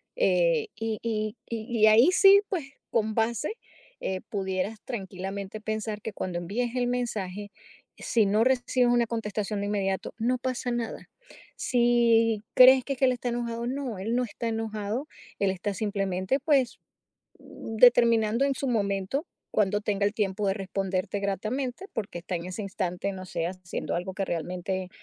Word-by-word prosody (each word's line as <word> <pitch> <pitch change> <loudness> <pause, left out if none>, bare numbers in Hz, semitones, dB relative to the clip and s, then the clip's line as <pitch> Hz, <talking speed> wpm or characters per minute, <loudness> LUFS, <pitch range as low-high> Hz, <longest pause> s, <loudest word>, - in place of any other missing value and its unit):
Eh, - - +2
y 225 -1 -3
y 215 -1 -2
y 230 0 -3
y 215 - +8
ahí 230 +11 +7
sí, 395 +1 +8
pues, 350 -7 -1 0.3
con 220 -2 0
base, 235 - 0 0.5
eh, 190 -1 -2
pudieras 190 +1 -2
tranquilamente 195 -2 -5
pensar 215 -1 -3
que 220 - -5
cuando 180 -3 -3
envíes 235 +8 -2
el 245 -1 +1
mensaje, 205 -5 -3 0.5
si 225 -3 +2
no 210 +3 +3
recibes 250 -1 +2
una 235 -1 +3
contestación 210 -2 -3
de - - -2
inmediato, 195 -2 -1
no 250 +3 +1
pasa 250 0 -3
nada. 235 -2 -4 0.5
Si 235 -3 +3
crees 255 0 +8
que 275 - -1
es 255 - -10
que 265 - +4
él 255 - +4
está 245 0 -3
enojado, 235 0 -3
no, 260 -5 -3
él 225 +5 -2
no 250 - +2
está 230 +1 -5
enojado, 220 +4 -3 0.3
él 200 - +2
está 195 +2 -3
simplemente, 195 +2 -1
pues, 275 -6 +2 0.6
determinando 230 0 +3
en 275 - +1
su 275 - -3
momento 205 - 0 0.3
cuándo 205 0 +2
tenga 205 -1 0
el 205 - +1
tiempo 205 -1 -1
de 195 - +2
responderte 195 0 -2
gratamente, 245 - -2
porque 200 -6 -4
está 180 +1 -4
en 170 +1 -4
ese 185 +4 -5
instante, 190 0 -2
no 185 0 -7
sé, 170 -2 -2
haciendo 185 -2 -4
algo 180 +2 -3
que 195 0 -2
realmente, 180 +2 -3
215 Hz, 165 wpm, -27 LUFS, 195-240 Hz, 0.6 s, y